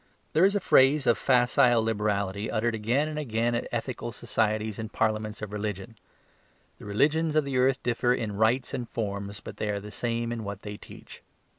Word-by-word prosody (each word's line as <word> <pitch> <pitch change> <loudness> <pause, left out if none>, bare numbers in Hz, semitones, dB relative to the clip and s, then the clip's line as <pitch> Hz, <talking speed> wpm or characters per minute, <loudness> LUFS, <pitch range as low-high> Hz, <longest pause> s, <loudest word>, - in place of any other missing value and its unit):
There 165 +4 +5
is 200 +1 +2
a - - +3
phrase 140 -4 +4
of 120 - +4
facile 120 -2 +4
liberality 105 -2 -1
uttered 115 +2 0
again 120 +7 0
and 155 -1 -4
again 120 -4 0
at 120 - -2
ethical 120 0 -4
societies 110 -1 -1
and 110 0 -5
parliaments 110 -1 -1
of 105 - -5
religion: 105 +1 -4 0.8
"the - - -11
religions 150 +9 +1
of 155 - +4
the 135 -2 -1
earth 130 +1 +2
differ 120 0 +1
in 115 -5 -1
rites 115 +5 +1
and 120 -2 -4
forms, 100 -2 -4
but - - -9
they 105 - -2
are 100 -1 -1
the 105 +1 -10
same 115 +1 -2
in 115 -2 -4
what 100 0 -6
they 105 -1 -6
teach." - - -13
115 Hz, 190 wpm, -27 LUFS, 105-125 Hz, 0.8 s, There